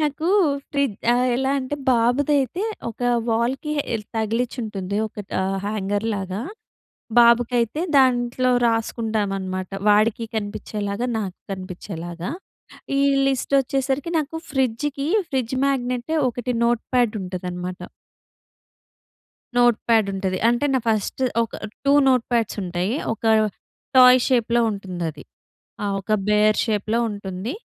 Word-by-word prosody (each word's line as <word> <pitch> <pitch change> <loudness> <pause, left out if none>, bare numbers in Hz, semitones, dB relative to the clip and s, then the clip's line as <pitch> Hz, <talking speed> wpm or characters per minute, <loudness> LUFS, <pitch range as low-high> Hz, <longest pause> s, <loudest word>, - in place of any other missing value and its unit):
నాకు 305 +2 -1 0.4
ఫ్రి 280 -1 +2 0.5
ఎలా 265 +1 0
అంటే, 260 +2 -3 0.2
బాబుదైతే 270 - +2 0.3
ఒక 230 - -10 0.3
వాల్‍కి 250 +6 0 0.2
ఎల్ 215 -2 -3
తగిలించి 230 +4 -1
ఉంటుంది 200 -2 -4
ఒక‌టా 205 -3 -5 0.2
హ్యాంగర్‌ 205 +1 -2
లాగా, 190 +1 -4 0.8
బాబుకి 235 +1 +5
అయితే 235 +7 -1 0.2
దాంట్లో 255 -1 +2 0.2
రాసుకుంటామనమాట. 205 -5 -2 0.2
వాడికి 215 +2 +3
కనిపించేలాగా, 205 +2 -3
నాకు 190 -4 -5
కనిపించేలాగా. 175 0 -6 0.7
ఈ - - +3 0.3
లిస్టోచ్చేసరికి 275 +3 0
నాకు 310 +2 -3
ఫ్రిడ్జ్‌కి, 275 +2 -1 0.2
ఫ్రిడ్జ్ 260 -1 -1
మ్యాగ్నెట్ 250 +1 -1 0.2
ఒకటి 245 +1 -3
నోట్‌ప్యాడ్ 240 -1 +1
ఉంటదనమాట... 180 0 -5 1.8
నోట్‌ప్యాడ్ 230 -3 +3
ఉంటది. 190 -1 -2
అంటే 240 +4 +1
నా 260 - +3
ఫస్ట్ 215 +4 -1 0.2
ఒక 225 - -8 0.3
2 280 - +5 0.2
నోట్‌ప్యాడ్స్ 235 -3 +1
ఉంటయి. 180 +4 -2 0.2
ఒక 225 - -15 0.7
టాయ్ 255 0 +8
షేప్‍లో 240 -2 +2
ఉంటుందది. 175 -6 -5 0.6
ఆ! - - 0 0.2
ఒక 215 - -6 0.2
బేర్ 210 0 +4
షేప్‌లో 220 +1 0
ఉంటుంది. 200 +3 -5
230 Hz, 105 wpm, -22 LUFS, 200-255 Hz, 1.8 s, టాయ్